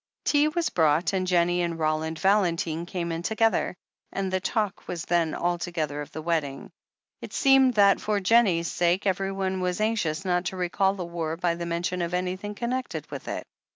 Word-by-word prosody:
Tea 290 0 +4
was 330 +2 -1
brought, 160 +3 +2
and 185 -1 0
Jennie 175 0 +2
and 170 -1 -2
Roland 160 0 -1
Valentine 170 -4 +1
came 170 -2 -3
in 165 0 -3
together, 220 -1 +1 0.4
and 195 -1 -3
the 185 - +2
talk 205 +1 -2
was 170 -2 -4
then 170 -2 +1
altogether 170 -4 -2
of 145 - -8
the 155 - -7
wedding. 155 -5 -2 0.5
It - - -9
seemed 270 -2 +5
that, 200 -2 +5
for 210 -1 0
Jennie's 190 -5 +3
sake, 175 +3 +1
every 195 0 0
one 190 -1 -2
was 180 +1 -1
anxious 205 -6 0
not 180 -1 +1
to 185 - -3
recall 190 +2 +1
the 180 -3 -4
war 165 -2 -3
by 175 -1 +1
the 170 0 -5
mention 175 +2 -2
of 170 +1 -1
anything 185 +3 -3
connected 250 +3 -3
with - - -7
it. - - -4
180 Hz, 190 wpm, -26 LUFS, 170-195 Hz, 0.5 s, seemed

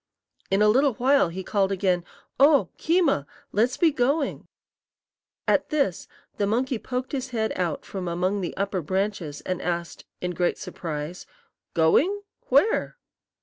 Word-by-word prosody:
In 195 +2 +3
a - - +5
little 260 +3 +4
while 265 -5 +3
he 185 +3 -6
called 195 0 +1
again: 185 -2 +1 0.4
"Oh, 285 0 +5
Keema! 320 - +2 0.2
let's 230 +5 +1
be 330 -2 +4
going." 280 +2 0 1.0
At - - +2
this 280 - 0 0.3
the 200 - +1
monkey 245 +3 0
poked 250 +4 -4
his 265 -3 -3
head 220 -3 -1
out 175 -4 -2
from 190 -2 -5
among 185 +4 0
the 175 - -4
upper 195 -1 -1
branches 185 -3 -2
and 185 -1 -3
asked, 170 -1 -3
in 180 - -2
great 175 0 0
surprise, 165 -2 -6 0.5
"Going? 340 - +3 0.2
Where?" 450 +1 +2
200 Hz, 145 wpm, -25 LUFS, 180-265 Hz, 1.0 s, a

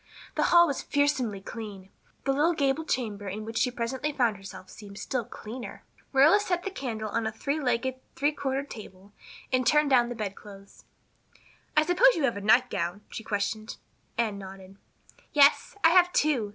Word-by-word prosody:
The - - +1
hall 345 0 +6
was 285 -5 -2
fearsomely 260 -8 0
clean; 200 -3 -8 0.3
the 270 - +1
little 315 +5 +2
gable 285 +2 0
chamber 210 -8 -2
in 210 +3 -5
which 225 +1 -3
she 250 - +2
presently 250 +4 -3
found 240 -6 +1
herself 195 -1 -11
seemed 200 -1 -12
still 250 +1 -2
cleaner. 230 +3 -9 0.3
Marilla 290 +9 +6
set 355 -3 -1
the 390 - -4
candle 225 - -4
on 225 +1 -1
a - - -2
three 280 +7 -2
legged, 260 -1 -1 0.2
three 290 +2 +1
cornered 275 -1 -3
table 200 -2 -11 0.4
and 255 0 +3
turned 300 -1 +3
down 240 -2 +4
the 245 - -5
bedclothes. 200 -2 -9 0.9
"I 305 - +5
suppose 470 +9 +5
you 320 - -1
have 240 -5 +1
a 200 - -5
nightgown?" 205 -4 +2
she 225 - -6
questioned. 215 +1 -3 0.4
Anne 215 -4 -1
nodded. 190 0 -11 0.6
"Yes, 285 +5 +4
I 330 - +8
have 355 0 +5
two. 275 -12 +1
240 Hz, 175 wpm, -27 LUFS, 205-285 Hz, 0.9 s, I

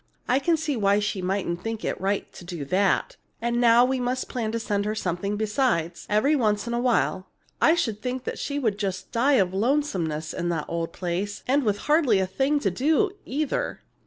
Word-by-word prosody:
I 255 - +3
can 335 +3 +2
see 305 -2 -2
why 200 -3 +3
she 205 -2 -1
mightn't 180 -2 -2
think 225 +1 -4
it - - -2
right 195 +1 -1
to - - -11
do 175 -5 -6
that. 190 +6 +1 0.2
And 235 +1 0
now 235 +1 +6
we 260 0 0
must 250 +1 -1
plan 225 -3 -2
to 230 - -2
send 205 -3 -1
her 215 +1 -1
something 200 +1 -2
besides, 210 - 0
every 220 +9 +3
once 210 -6 +1
in 235 - -3
a 235 - 0
while. 240 -6 +1 0.3
I 320 - +6
should 225 -10 -1
think 255 0 -4
she'd 250 -8 -2
just 190 -3 -3
die 250 +4 +3
of 190 -7 +3
lonesomeness 190 - 0
in 175 -1 -2
that 165 -3 -1
old 165 0 -3
place, 185 +4 -3
and 275 +3 +3
with 210 -5 0
hardly 295 -8 +4
a 190 - +2
thing 270 +10 +1
to 195 - +1
do, 315 - +2 0.2
either!" 290 +2 -2
215 Hz, 200 wpm, -25 LUFS, 190-255 Hz, 0.3 s, now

